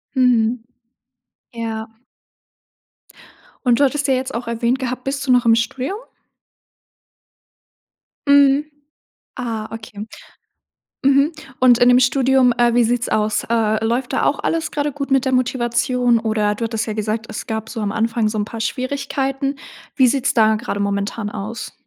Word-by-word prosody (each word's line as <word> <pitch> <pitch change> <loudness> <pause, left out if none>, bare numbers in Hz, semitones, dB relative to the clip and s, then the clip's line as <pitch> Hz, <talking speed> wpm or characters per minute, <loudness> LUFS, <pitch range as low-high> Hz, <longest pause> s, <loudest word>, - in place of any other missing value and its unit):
Mhm. 245 -2 +2 0.9
Ja. 225 -1 -4 1.8
Und 240 -2 +4
du 285 - +6
hattest 285 +1 0
ja 265 - +4
jetzt 260 -1 -3
auch 235 +1 -4
erwähnt 235 +2 0
gehabt, 255 -1 -4
bist 275 0 -3
du 255 - +3
noch 245 -1 +4
im 230 - +5
Studium? 255 - -2 2.3
Mhm. 280 +1 +5 0.7
Ah, 225 -4 -4
okay. 215 -1 -8 1.0
Mhm, 275 +3 +4 0.3
und 250 -2 +5
in 245 0 +5
dem 250 0 +6
Studium, 260 0 +3
äh, 240 -1 +3
wie 240 -1 +4
sieht's 240 +1 0
aus? 215 0 0
Äh, 220 -1 +1
läuft 240 +4 -1
da - - 0
auch - - +1
alles 325 -1 -1
grade 290 0 -2
gut 280 0 -5
mit 270 -1 +3
der 260 - -1
Motivation 245 -1 +1
oder 215 -2 0
du 230 - -4
hattest 225 -1 -2
ja 215 - -3
gesagt: 215 +1 -3
„Es 215 - -6
gab 220 0 -4
so 230 - -6
am 205 -1 -1
Anfang 225 0 0
so 215 0 -3
‘n 205 - 0
paar 225 +1 -8
Schwierigkeiten“. 275 +2 -2 0.4
Wie 260 -2 +5
sieht's 265 +2 +1
da 220 -2 +4
gerade 215 -1 -4
momentan 200 +2 -2
aus? 215 +3 -6
240 Hz, 155 wpm, -19 LUFS, 220-265 Hz, 2.3 s, du